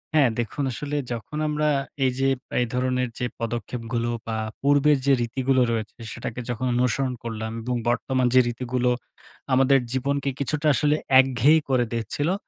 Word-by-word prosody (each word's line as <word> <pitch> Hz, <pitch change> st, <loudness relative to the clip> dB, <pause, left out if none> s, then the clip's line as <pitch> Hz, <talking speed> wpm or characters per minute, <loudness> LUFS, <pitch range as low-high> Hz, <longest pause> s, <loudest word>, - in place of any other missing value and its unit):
হ্যাঁ, 145 Hz, -5 st, +5 dB
দেখুন 120 Hz, +5 st, -2 dB
আসলে 145 Hz, +4 st, -4 dB, 0.2 s
যখন 120 Hz, +6 st, -5 dB
আমরা 150 Hz, 0 st, 0 dB, 0.4 s
এইযে 130 Hz, +1 st, +1 dB, 0.3 s
এই 125 Hz, -, +2 dB
ধরনের 125 Hz, 0 st, 0 dB
যে 125 Hz, -, 0 dB
পদক্ষেপগুলো 115 Hz, 0 st, -3 dB, 0.2 s
বা, 110 Hz, -, -2 dB, 0.3 s
পূর্বের 145 Hz, +1 st, +4 dB
যে 140 Hz, -, +5 dB
রীতিগুলো 130 Hz, +2 st, +1 dB
রয়েছে, 110 Hz, -2 st, -3 dB, 0.2 s
সেটাকে 120 Hz, 0 st, -6 dB
যখন 120 Hz, +1 st, -2 dB
অনুসরণ 125 Hz, +1 st, +1 dB
করলাম 110 Hz, -1 st, -4 dB
এবং 125 Hz, +2 st, -2 dB
বর্তমান 130 Hz, +2 st, 0 dB
যে 130 Hz, -, +7 dB
রীতিগুলো 125 Hz, +1 st, -1 dB, 0.6 s
আমাদের 135 Hz, +1 st, +5 dB
জীবনকে 140 Hz, +2 st, 0 dB
কিছুটা 150 Hz, +2 st, 0 dB
আসলে 150 Hz, +1 st, +2 dB, 0.2 s
একঘেয়েই 135 Hz, +4 st, +4 dB
করে 125 Hz, -2 st, +2 dB
দিচ্ছিলো, 115 Hz, -, -1 dB
130 Hz, 145 wpm, -24 LUFS, 120-140 Hz, 0.6 s, যে